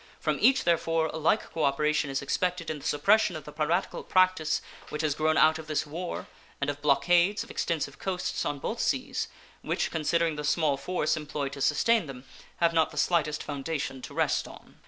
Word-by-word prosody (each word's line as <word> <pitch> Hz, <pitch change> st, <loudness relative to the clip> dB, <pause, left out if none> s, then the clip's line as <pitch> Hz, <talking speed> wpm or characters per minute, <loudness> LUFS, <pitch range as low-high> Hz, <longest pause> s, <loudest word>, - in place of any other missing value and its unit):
From -, -, -1 dB
each, 265 Hz, 0 st, +5 dB
therefore, 165 Hz, -1 st, +1 dB
a -, -, -3 dB
like 160 Hz, +7 st, +1 dB
cooperation 150 Hz, -1 st, +1 dB
is 135 Hz, 0 st, -2 dB
expected 180 Hz, +3 st, -1 dB
in 155 Hz, -, -5 dB
the -, -, -12 dB
suppression 190 Hz, +5 st, +3 dB
of 155 Hz, -, -6 dB
the 150 Hz, -, -10 dB
piratical 160 Hz, +4 st, -1 dB
practice 185 Hz, -4 st, +2 dB, 0.3 s
which 150 Hz, +1 st, -3 dB
has 155 Hz, -2 st, +1 dB
grown 155 Hz, +1 st, +1 dB
out 160 Hz, +1 st, +5 dB
of 155 Hz, -, -9 dB
this 155 Hz, -1 st, -1 dB
war 170 Hz, +4 st, -5 dB, 0.3 s
and 140 Hz, +1 st, 0 dB
of 145 Hz, 0 st, -10 dB
blockades 175 Hz, +7 st, +3 dB
of -, -, -11 dB
extensive 145 Hz, -4 st, -2 dB
coasts 185 Hz, -2 st, -2 dB
on 145 Hz, -, -2 dB
both -, -, -4 dB
seas, -, -, -1 dB, 0.3 s
which, -, -, -1 dB
considering 165 Hz, 0 st, 0 dB
the 150 Hz, -, -4 dB
small 150 Hz, -1 st, +2 dB
force 165 Hz, +2 st, -1 dB
employed 145 Hz, -2 st, -4 dB
to 140 Hz, -, -7 dB
sustain 210 Hz, +7 st, +3 dB
them, 130 Hz, -2 st, -9 dB, 0.3 s
have 170 Hz, -1 st, +2 dB
not 160 Hz, -1 st, +3 dB
the -, -, -12 dB
slightest 155 Hz, -4 st, +1 dB
foundation 140 Hz, -2 st, -4 dB
to -, -, -9 dB
rest -, -, +1 dB
on. -, -, -15 dB
155 Hz, 195 wpm, -28 LUFS, 145-170 Hz, 0.3 s, each